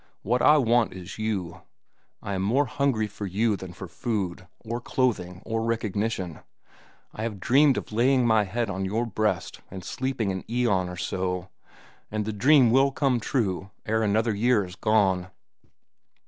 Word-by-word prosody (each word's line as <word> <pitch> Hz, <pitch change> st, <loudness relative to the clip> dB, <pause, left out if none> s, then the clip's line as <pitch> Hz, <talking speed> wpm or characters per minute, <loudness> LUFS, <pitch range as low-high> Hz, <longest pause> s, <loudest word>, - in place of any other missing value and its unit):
What 120 Hz, +4 st, +1 dB
I 150 Hz, -, +6 dB
want 120 Hz, -3 st, +2 dB
is 95 Hz, +2 st, -9 dB
you; 100 Hz, -6 st, -3 dB, 0.6 s
I 100 Hz, -, -3 dB
am 95 Hz, -, -1 dB
more 125 Hz, +9 st, +2 dB
hungry 135 Hz, -4 st, 0 dB
for 100 Hz, 0 st, -6 dB
you 105 Hz, +4 st, +1 dB
than 95 Hz, -2 st, -8 dB
for 95 Hz, +1 st, -8 dB
food, 90 Hz, -1 st, -3 dB
or 115 Hz, +2 st, -4 dB
clothing, 95 Hz, -9 st, -1 dB
or 115 Hz, 0 st, -1 dB
recognition. 110 Hz, -5 st, -2 dB, 0.7 s
I -, -, -7 dB
have 115 Hz, 0 st, -2 dB
a -, -, -10 dB
dream 135 Hz, +8 st, +4 dB
of -, -, -5 dB
laying 125 Hz, +3 st, +3 dB
my 110 Hz, -2 st, +4 dB
head 115 Hz, +4 st, -2 dB
on 95 Hz, -1 st, -3 dB
your 110 Hz, +5 st, -1 dB
breast 105 Hz, -5 st, -2 dB
and 95 Hz, -1 st, -8 dB
sleeping 130 Hz, -6 st, -2 dB
an 95 Hz, -1 st, -4 dB
aeon 110 Hz, -7 st, +1 dB
or 90 Hz, -, -7 dB
so, 90 Hz, +1 st, -2 dB, 0.6 s
and 105 Hz, 0 st, -2 dB
the 110 Hz, -, -3 dB
dream 130 Hz, +2 st, +5 dB
will 135 Hz, +3 st, +4 dB
come 135 Hz, -3 st, +1 dB
true 100 Hz, -6 st, -1 dB, 0.2 s
ere 110 Hz, +1 st, +1 dB
another 110 Hz, +1 st, +2 dB
year 110 Hz, 0 st, +2 dB
is 90 Hz, 0 st, -10 dB
gone." 100 Hz, -5 st, +2 dB
110 Hz, 170 wpm, -26 LUFS, 95-120 Hz, 0.7 s, I